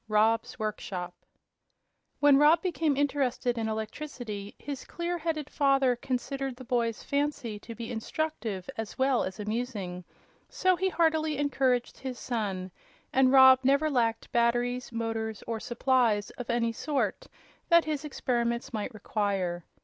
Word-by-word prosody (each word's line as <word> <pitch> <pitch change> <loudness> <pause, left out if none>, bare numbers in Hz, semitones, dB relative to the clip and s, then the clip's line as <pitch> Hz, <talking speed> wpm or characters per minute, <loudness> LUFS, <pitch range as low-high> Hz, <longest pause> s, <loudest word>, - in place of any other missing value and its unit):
Rob's 225 +3 +2
Workshop 195 -5 -4 1.1
When 290 -1 +6
Rob 300 +3 +5
became 325 -6 0
interested 270 -3 0
in 225 -1 -2
electricity 220 -2 -5
his 280 -2 -6
clear 345 0 -3
headed 310 -3 -2
father 275 -3 +3
considered 265 +2 -3
the 260 - -10
boy's 235 -3 -1
fancy 280 -7 -2
to 230 +2 -9
be 230 -1 -6
instructive 225 - -3
as 225 -1 -5
well 265 -1 +2
as 190 +3 -5
amusing; 210 -5 -3 0.5
so 370 0 +2
he 380 +2 0
heartily 315 -3 +1
encouraged 265 -4 0
his 260 -2 -5
son, 195 -7 -3 0.4
and 260 0 +5
Rob 260 -1 +8
never 280 +4 +3
lacked 230 -4 0
batteries, 240 +1 +1
motors 225 -2 -3
or 230 -1 -3
supplies 240 -4 +1
of 245 - -8
any 235 -1 +1
sort 285 +4 -2 0.4
that 340 0 +6
his 305 -2 -2
experiments 240 -5 -1
might 215 +3 -3
require. 195 -5 -2
245 Hz, 135 wpm, -29 LUFS, 220-280 Hz, 1.1 s, Rob